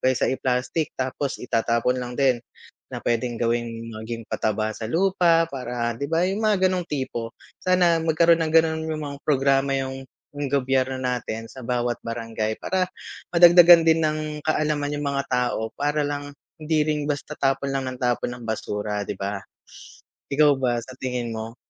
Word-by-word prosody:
kaysa 130 -1 +2
i-plastic 130 +4 -1
tapos 130 +1 -2
itatapon 115 +1 +1
lang 125 0 -6
din, 130 -3 +3 0.5
na - - -4
pwedeng 120 0 -1
gawin 115 -1 -1
maging 115 +1 -6
pataba 110 0 -1
sa 110 - -6
lupa 170 -1 +3
para 120 -4 -3
'di 140 - -4
ba 165 +2 +2
yung 200 +3 -2
mga 205 -3 +3
ganung 185 -1 -1
tipo, 125 -5 -3 0.3
sana 175 -3 +3
magkaroon 165 +1 +4
ng 155 -1 -2
ganun 160 -1 +3
yung 155 -1 -3
mga 140 0 -7
programa 135 -1 +2
yung 135 0 -4 0.3
yung 145 -1 -3
gobyerno 130 -1 +1
natin 125 -3 -3
sa 130 +3 -11
bawat 120 0 -1
barangay 115 -2 -3
para 185 -1 -1 0.4
madagdagan 175 -1 +8
din 165 0 +4
ng 155 0 +1 0.3
kaalaman 150 -2 0
yung 145 - -3
mga 140 0 -1
tao 125 -3 0
para 150 +1 0
lang 145 0 -4 0.3
hindi 155 0 +1
rin 150 -1 0
basta 145 +1 -3
tapon 135 0 0
lang 135 -1 -1
ng 130 -1 -6
tapon 120 -1 0
ng 120 - -11
basura 105 -1 -3
'di - - -3
ba? 100 +1 -2 0.9
Ikaw 150 +1 +5
ba 125 -2 0
sa 130 +2 -11
tingin 125 -3 -3
mo? 110 +1 -6
135 Hz, 165 wpm, -24 LUFS, 120-155 Hz, 0.9 s, madagdagan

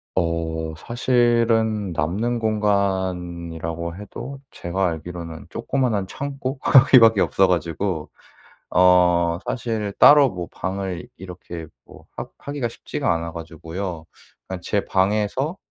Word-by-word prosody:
어. 85 -2 -1 0.2
사실은 115 -2 +1
남는 100 +10 -1
공간이라고 90 -6 -1
해도 125 +7 -8
제가 90 +2 -1
알기로는 85 0 -7
조그마한 120 -8 -1
창고 135 +3 -5
거기 130 0 +7
밖에 115 -2 +6
없어 95 0 +3
가지고 85 -1 -1 0.6
어 90 -1 +4
사실 110 -4 -2
따로 145 -2 +8
뭐 90 -5 -6
방을 95 +2 -4
이렇게 90 -3 -8 0.2
뭐 - - -16
하 - - -4
하기가 140 -4 -4
쉽지가 115 - -2
않아 85 0 -4
가지고요. 80 +1 -6 0.4
그냥 95 -1 -6
제 100 +2 -1
방에서 105 - 0
95 Hz, 250 characters per minute, -22 LUFS, 85-115 Hz, 0.6 s, 따로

